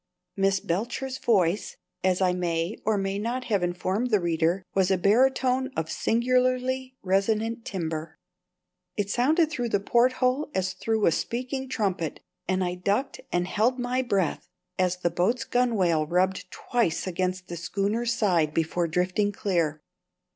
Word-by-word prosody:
Miss 195 -1 +2
Belcher's 240 +10 -3
voice 195 -4 +1 0.3
as 185 0 +2
I 180 -1 +3
may 175 +1 -1
or 215 -1 +2
may 195 0 -1
not 240 +4 -2
have 210 -6 0
informed 185 +6 -1
the 210 -3 +3
reader 170 +1 +1
was 190 -1 +2
a 190 - +3
baritone 255 +6 +3
of 160 - -2
singularly 255 +5 +1
resonant 215 +4 0
timbre. 160 -3 -4 0.8
It 200 -1 -1
sounded 310 - +3
through 245 -5 -2
the 200 - +2
porthole 255 +6 +2
as 185 0 0
through 220 +3 0
a - - +5
speaking 255 - -3
trumpet, 190 - -1 0.3
and 185 0 +1
I 180 0 -1
ducked 200 +9 -1
and 175 0 +1
held 230 +7 +1
my 250 +1 0
breath 200 -9 -1 0.3
as 185 -1 +2
the 175 -1 -1
boat's 190 +9 +1
gunwale 190 -11 +1
rubbed 185 +2 0
twice 230 -8 -1
against 185 0 -2
the 175 - -6
schooner's 205 +7 -1
side 175 -9 +1
before 165 +1 0
drifting 180 +5 +1
clear. 170 -7 -1
195 Hz, 145 wpm, -26 LUFS, 180-240 Hz, 0.8 s, a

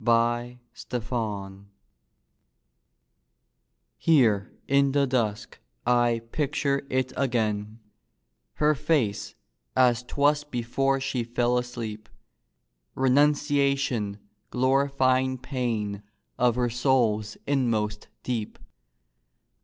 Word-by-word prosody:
REMEMBERED 120 -3 -2 2.4
Here 115 -11 +3 0.2
in 140 0 +3
the 140 -1 +3
dusk 115 -5 -2 0.3
I 120 -1 +2
picture 140 -2 -1
it 130 0 -1
again, 110 -4 -1 0.7
Her 150 0 +3
face, 120 -10 0 0.4
as 125 -2 +4
'twas 145 +3 +1
before 135 +1 0
she 130 -2 -2
fell 120 +1 0
asleep: 110 -3 -6 0.9
Renunciation 140 -5 +2 0.3
glorifying 130 0 +2
pain 115 -6 -3 0.4
Of 120 -1 +3
her 120 -1 0
soul's 115 -4 +1
inmost 110 -6 0 0.2
deep. 115 -4 -3
125 Hz, 75 wpm, -26 LUFS, 110-135 Hz, 2.4 s, as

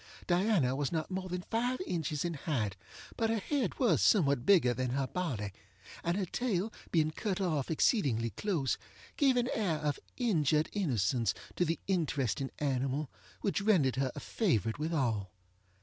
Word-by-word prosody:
Diana 175 - +2
was 140 -1 -1
not 160 +1 -2
more 185 0 -3
than 180 0 -3
five 245 +3 0
inches 155 - -2
in 170 - -1
height, 125 - -2 0.4
but 225 -1 +1
her 225 - +1
head 245 +1 -1
was 250 - +3
somewhat 140 - +3
bigger 165 -12 +5
than 130 0 -2
her 135 +2 0
body, 130 - -3 0.5
and 170 +2 0
her 200 - 0
tail 220 0 -1 0.2
being 155 -2 +2
cut 195 +3 -2
off 155 -8 0
exceedingly 135 - +2
close, 155 - -1 0.4
gave 270 -4 +3
an 245 0 +2
air 195 -7 +1
of 150 -1 -1 0.2
injured 155 - +2
innocence 120 - +1 0.2
to 180 - +2
the 165 +1 0
interesting 140 - 0
animal 135 +1 -1 0.3
which 200 -2 0
rendered 175 - +3
her 135 -1 +1
a - - -4
favorite 115 - 0
with 155 +2 -1
all. 115 - 0
160 Hz, 165 wpm, -32 LUFS, 135-195 Hz, 0.5 s, bigger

